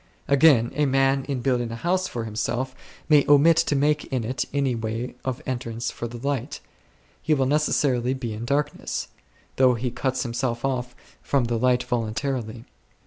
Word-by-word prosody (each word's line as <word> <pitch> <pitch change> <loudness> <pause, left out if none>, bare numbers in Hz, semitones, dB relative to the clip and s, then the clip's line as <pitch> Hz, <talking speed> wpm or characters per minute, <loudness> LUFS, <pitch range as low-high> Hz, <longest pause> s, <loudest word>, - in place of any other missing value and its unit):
Again, 140 -5 +5
a 150 +1 +1
man 135 0 +2
in 135 -3 -3
building 120 -3 +1
a - - -4
house 180 +8 0
for 120 - -4
himself 120 +4 -2 0.3
may 150 -2 +6
omit 145 +3 +6
to 165 -3 +2
make 150 +2 +1
in 130 -3 -2
it 125 +3 -2
any 140 -2 +1
way 115 +2 -4
of 130 -2 -4
entrance 120 -2 -3
for 120 - -5
the 120 +1 -8
light; 140 -5 -2 0.6
he 155 0 +2
will 135 -2 +1
necessarily 135 -3 +1
be 120 -4 -4
in 110 +2 -6
darkness, 145 +3 -2 0.5
though 130 -2 +5
he 120 +1 -3
cuts 130 0 -1
himself 120 0 -2
off 125 -2 -2 0.3
from 140 -3 +1
the 120 0 -1
light 125 0 +2
voluntarily. 120 -1 -3
130 Hz, 170 wpm, -24 LUFS, 120-140 Hz, 0.6 s, may